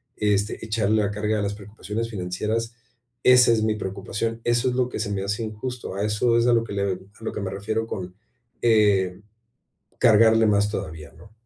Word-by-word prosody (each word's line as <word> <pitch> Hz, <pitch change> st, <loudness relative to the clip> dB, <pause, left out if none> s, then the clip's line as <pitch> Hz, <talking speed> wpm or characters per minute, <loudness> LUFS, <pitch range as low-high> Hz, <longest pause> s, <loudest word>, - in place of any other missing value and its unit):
este, 105 Hz, 0 st, 0 dB
echarle 110 Hz, -1 st, +1 dB
la 100 Hz, -, -1 dB
carga 105 Hz, +1 st, -1 dB
a -, -, -1 dB
las 100 Hz, 0 st, -2 dB
preocupaciones 105 Hz, +2 st, -5 dB
financieras, 105 Hz, +4 st, -3 dB, 0.5 s
esa 125 Hz, -1 st, +7 dB
es 110 Hz, -2 st, +2 dB
mi 110 Hz, 0 st, +1 dB
preocupación, 105 Hz, +3 st, -4 dB
eso 120 Hz, +2 st, +2 dB
es 125 Hz, -, -2 dB
lo 125 Hz, -1 st, +1 dB
que 120 Hz, -, -5 dB
se 105 Hz, -1 st, -2 dB
me 95 Hz, -1 st, -2 dB
hace 105 Hz, +3 st, -2 dB
injusto, 115 Hz, +3 st, -5 dB
a 100 Hz, -, -1 dB
eso 115 Hz, +3 st, +2 dB
es 120 Hz, +1 st, +2 dB
a 120 Hz, -, +5 dB
lo 115 Hz, -1 st, +3 dB
que 115 Hz, -, -9 dB
le 100 Hz, 0 st, -1 dB
a 95 Hz, -2 st, -1 dB, 0.2 s
lo 110 Hz, -, -4 dB
que -, -, -4 dB
me 95 Hz, -1 st, -3 dB
refiero 110 Hz, +3 st, -2 dB
con, 90 Hz, -4 st, -6 dB, 0.5 s
eh, 100 Hz, -4 st, +3 dB, 0.8 s
cargarle 115 Hz, -1 st, +5 dB
más 105 Hz, 0 st, +2 dB
todavía, 80 Hz, -7 st, -6 dB
¿no? 85 Hz, +6 st, -16 dB
105 Hz, 200 wpm, -24 LUFS, 100-115 Hz, 0.8 s, esa